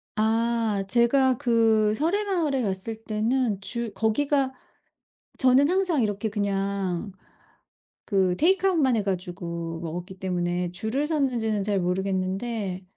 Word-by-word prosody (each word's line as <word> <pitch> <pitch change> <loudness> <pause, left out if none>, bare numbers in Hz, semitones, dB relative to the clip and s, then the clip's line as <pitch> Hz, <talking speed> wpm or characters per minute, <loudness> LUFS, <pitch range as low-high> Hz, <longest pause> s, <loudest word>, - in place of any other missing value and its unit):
아. 230 +2 +1 0.3
제가 255 +2 +3
그 225 -4 +3
서래마을에 330 - 0
갔을 195 +2 -2
때는 220 -1 0
주 235 +1 -2
거기가 265 +6 +1 0.9
저는 260 +3 +5
항상 365 -7 +1
이렇게 210 0 -1
그냥 200 -2 -2 0.9
그 190 -4 +1
테이크아웃만 340 - +3
해 215 - +1
가지고 175 -3 -4
먹었기 175 +3 -6
때문에 175 -1 -2
줄을 220 +10 -1
섰는지는 245 -9 0
잘 200 0 0
모르겠는데 190 +2 -2
220 Hz, 255 characters per minute, -25 LUFS, 190-260 Hz, 0.9 s, 저는